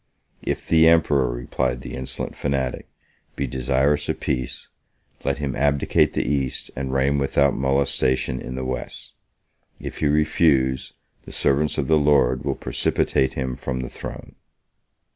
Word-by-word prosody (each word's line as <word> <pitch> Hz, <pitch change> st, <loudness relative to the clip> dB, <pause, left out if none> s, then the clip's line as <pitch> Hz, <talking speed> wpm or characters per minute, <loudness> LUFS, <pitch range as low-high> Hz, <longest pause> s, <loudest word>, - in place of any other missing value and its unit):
"If -, -, -3 dB
the 80 Hz, 0 st, +5 dB
emperor," 75 Hz, -6 st, +4 dB
replied 60 Hz, +1 st, -2 dB
the -, -, -8 dB
insolent 65 Hz, 0 st, -4 dB
fanatic, 65 Hz, -3 st, -2 dB, 0.5 s
"be 70 Hz, -, -1 dB
desirous 70 Hz, +3 st, +1 dB
of -, -, -1 dB
peace, 65 Hz, 0 st, -3 dB, 0.5 s
let 70 Hz, -, 0 dB
him 70 Hz, -3 st, -3 dB
abdicate 70 Hz, +1 st, +2 dB
the -, -, 0 dB
East, 70 Hz, -1 st, -2 dB
and 65 Hz, 0 st, -3 dB
reign 70 Hz, +2 st, +2 dB
without 70 Hz, 0 st, +2 dB
molestation 65 Hz, -1 st, +1 dB
in 65 Hz, -, -6 dB
the 65 Hz, 0 st, -4 dB
West. 65 Hz, 0 st, -5 dB, 0.7 s
If -, -, -7 dB
he 75 Hz, -, +2 dB
refuse, 70 Hz, -3 st, +2 dB, 0.3 s
the -, -, -10 dB
servants 75 Hz, +2 st, +1 dB
of -, -, 0 dB
the 80 Hz, -1 st, +4 dB
Lord 70 Hz, -4 st, +3 dB
will -, -, -1 dB
precipitate 65 Hz, -, 0 dB
him 65 Hz, -1 st, -3 dB
from 65 Hz, +1 st, -4 dB
the 60 Hz, -, -5 dB
throne." -, -, -8 dB
65 Hz, 145 wpm, -23 LUFS, 65-70 Hz, 0.7 s, the